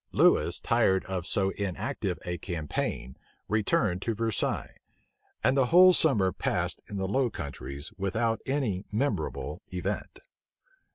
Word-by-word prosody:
Lewis, - - +3
tired 95 0 +2
of 95 -2 -2
so 95 -1 +3
inactive 100 -3 -3
a 90 -1 -3
campaign, 75 - -3 0.3
returned 105 -3 +1
to 115 +1 -1
Versailles; 115 0 -1 0.7
and 130 - +3
the 135 -2 +3
whole 185 +5 +8
summer 110 - +3
passed - - -2
in 100 - -5
the 95 0 -1
Low 130 +5 +1
Countries 70 -4 -7
without 115 +4 0
any 125 -9 -1
memorable 135 +7 -2
event. - - -4
100 Hz, 125 wpm, -28 LUFS, 90-120 Hz, 0.7 s, whole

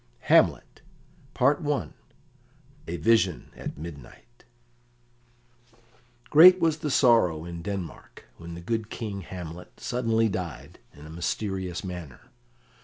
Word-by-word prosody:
] - - -36
Hamlet - - +3 0.6
A 140 - -3
Vision 95 -1 +1
at - - -7
Midnight 80 - -12 1.9
Great 180 +4 +9
was 160 -2 +1
the 150 - -3
sorrow 115 - +3
in 85 -1 -7
Denmark 95 -2 -7
when 85 0 -9
the 85 - -8
good 110 +3 -3
King 105 -4 -5
Hamlet 90 -1 -9
suddenly 115 -2 0
died 90 - -6 0.2
in 75 +1 -13
a - - -11
mysterious 95 +2 -3
manner. 90 -8 -9
95 Hz, 110 wpm, -26 LUFS, 85-115 Hz, 1.9 s, Great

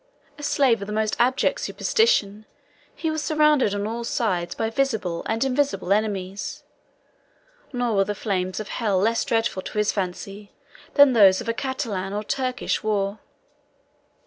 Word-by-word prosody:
A - - -8
slave 265 -6 +2
of 200 - -5
the 210 - -4
most 215 0 0
abject 260 - +2
superstition, 215 - +1 0.5
he 320 - -2
was 315 -1 -2
surrounded 300 -9 +3
on 205 0 -2
all 230 +2 -3
sides 185 -7 -1
by 225 0 -2
visible 220 -10 -1
and 225 +2 0
invisible 270 -7 +1
enemies; 200 -2 -3 1.1
nor 245 -4 -1
were 195 - +5
the 205 +1 -3
flames 185 -2 -2
of 215 - -6
hell 210 -5 0
less 225 +5 +2
dreadful 225 -4 0
to 210 - -8
his 210 0 +2
fancy, 195 +2 -5 0.4
than 285 -2 +7
those 195 -5 +6
of - - -7
a 230 - +1
Catalan 230 -8 -3
or 210 +1 -2
Turkish 255 +1 -2
war. 205 -1 -1
220 Hz, 155 wpm, -24 LUFS, 200-255 Hz, 1.1 s, than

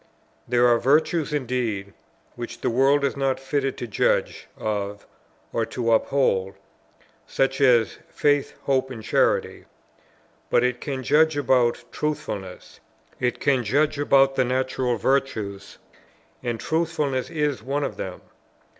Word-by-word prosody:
There 120 0 +4
are 120 -1 +4
virtues 155 +4 +2
indeed, 120 -8 -2 0.4
which 120 -1 -7
the - - 0
world 135 +4 +3
is 140 - 0
not 135 -1 0
fitted 135 0 -2
to - - -4
judge 105 - 0
of 100 -1 -3 0.5
or 115 - +1
to 115 -2 -1
uphold, 110 -5 +1 0.7
such 135 +1 0
as 120 -6 +4
faith, 145 -1 +1
hope, 130 -1 +1
and 115 -4 -8
charity: - - +1 0.8
but 120 - +3
it 125 -1 0
can 135 -3 -4
judge 155 +2 +3
about 125 -3 +2
Truthfulness; 105 -11 -5 0.4
it 125 0 -1
can 135 -3 +2
judge 145 +6 +1
about 135 -1 +4
the 130 - +3
natural 130 -1 -1
virtues, 105 -5 -1 0.6
and 120 -2 -3
Truthfulness 155 -5 -1
is 150 -7 -1
one 140 +5 -2
of - - -4
them. - - -6
130 Hz, 130 wpm, -24 LUFS, 120-140 Hz, 0.8 s, There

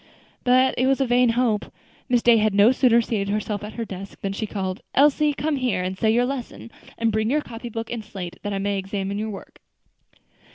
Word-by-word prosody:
But 255 +1 +4
it 255 - +3
was 270 0 +2
a 270 - +2
vain 245 0 +3
hope. 225 -4 0 0.4
Miss 245 -2 +2
Day 235 -1 +6
had 215 -2 +1
no 205 +4 +6
sooner 245 -3 +4
seated 205 -3 -2
herself 210 0 -2
at 210 - -7
her 230 - -4
desk, 195 -1 -9
than 195 0 -2
she 215 +2 -3
called, 190 0 -4
"Elsie, 295 +2 +4
come 295 0 -1
here 235 -9 0
and 185 +1 -3
say 220 +3 +2
that 245 - +3
lesson; 250 -3 -6 0.3
and 230 0 +1
bring 215 +1 0
your 300 +4 +2
copybook 230 -2 -7
and 235 -2 -4
slate, 190 -4 -7
that 205 - -4
I 200 - -2
may 200 0 -1
examine 195 +1 -3
your 220 +1 -3
work." 200 - -10
225 Hz, 215 wpm, -23 LUFS, 200-245 Hz, 0.4 s, Day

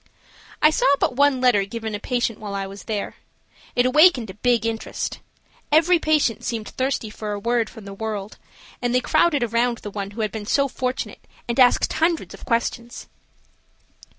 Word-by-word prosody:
I 305 - +7
saw - - +1
but 250 - 0
one 285 -1 +3
letter 245 -6 +4
given 220 +2 -5
a 205 - -3
patient 240 -1 -1
while 205 -2 -6
I 195 0 -2
was 195 +1 -10
there. 210 -3 -4 0.6
It 245 - +3
awakened 255 - +5
a - - -13
big 230 +2 +1
interest. 225 -1 -3 0.5
Every 330 +3 +5
patient 305 -8 +1
seemed 225 -3 -3
thirsty 260 -4 -2
for 210 -1 -5
a 205 - -4
word 235 +1 0
from 220 - -12
the 200 - -8
world, 210 -1 -5 0.4
and 245 0 0
they - - +5
crowded 305 0 +2
around 235 +1 +1
the 205 - -8
one 200 -1 -4
who 215 +3 -6
had 215 -2 -1
been 210 -2 -6
so 280 +3 +2
fortunate 255 0 -4 0.3
and 235 +2 -2
asked 250 -1 +4
hundreds 330 0 0
of - - -12
questions. 235 0 -2
235 Hz, 180 wpm, -22 LUFS, 215-260 Hz, 0.6 s, I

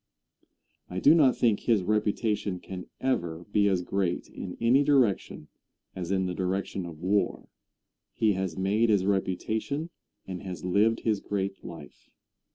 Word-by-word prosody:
I 90 - -3
do 145 - +7
not 145 -6 +4
think 115 -4 +3
his 110 -6 +2
reputation 105 -1 0
can 90 0 -8
ever 85 -10 -1
be 100 -1 +3
as 95 -3 +1
great 95 -1 -1
in 90 - -7
any 125 +5 +4
direction 125 - +1 0.5
as 90 -2 -5
in 95 -1 +1
the 90 - -2
direction 95 0 -2
of 80 0 -10
war. 100 +2 0 0.7
He 110 -3 +3
has 95 -3 -3
made 105 +5 +2
his 100 -3 +3
reputation 110 - -1 0.3
and 90 -2 -6
has 90 -4 -7
lived 105 +5 +2
his 110 -3 +1
great 100 -1 -3
life. 80 -4 -11
100 Hz, 150 wpm, -28 LUFS, 90-110 Hz, 0.7 s, do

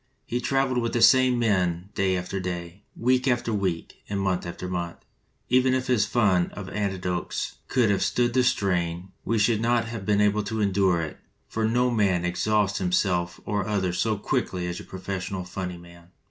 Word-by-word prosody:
"He 120 +1 -2
traveled 135 -2 +1
with 115 -1 -2
the 120 - +1
same 130 -2 +6
men 95 -5 +1
day 95 -1 +1
after 90 +2 -3
day, 90 0 -5 0.2
week 125 +2 +2
after 120 -2 +1
week, 95 -5 -2
and 100 -1 -1
month 95 -2 -1
after 90 +1 -6
month. 85 -2 -3 0.5
Even 130 +1 +3
if 130 0 -1
his 115 -5 +2
fund 100 -7 +2
of 100 -2 -7
anecdotes 95 -8 -3
could 120 -5 +2
have 100 - +1
stood 120 -1 +1
the 130 - +4
strain, 90 -6 0
we 115 - 0
should 110 +1 +2
not 120 0 +2
have 115 -3 -6
been 105 +1 +2
able 105 +1 +3
to 110 +1 -3
endure 95 -4 +2
it, 80 - -7 0.3
for 110 0 -1
no 125 +2 +2
man 95 -6 +2
exhausts 105 +3 +1
him 90 -1 0
self 90 -2 +1
or 100 -2 -1
others 95 -4 -1
so 110 -2 +1
quickly 90 -2 -1
as 90 0 -4
your - - -11
professional 95 0 -4
funny 90 -1 -5
man." 85 0 -15
100 Hz, 190 wpm, -26 LUFS, 90-115 Hz, 0.5 s, same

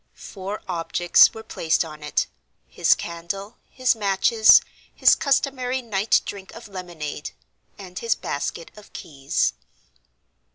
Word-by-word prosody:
Four 200 +1 -7
objects 175 0 +4
were 220 - -10
placed 165 -6 0
on 155 -1 -11
it; 150 -1 -1 0.4
his - - +3
candle, 195 +6 -6
his 255 -1 +1
matches, 215 +2 +5 0.3
his - - +5
customary 260 -2 0
night 210 -2 +1
drink 195 -1 -8
of 230 -1 -11
lemonade, 175 -6 -7 0.5
and 185 -2 -9
his 230 -1 0
basket 165 +4 -5
of 210 -1 -15
keys. 140 -6 -2
195 Hz, 120 wpm, -23 LUFS, 170-220 Hz, 0.5 s, matches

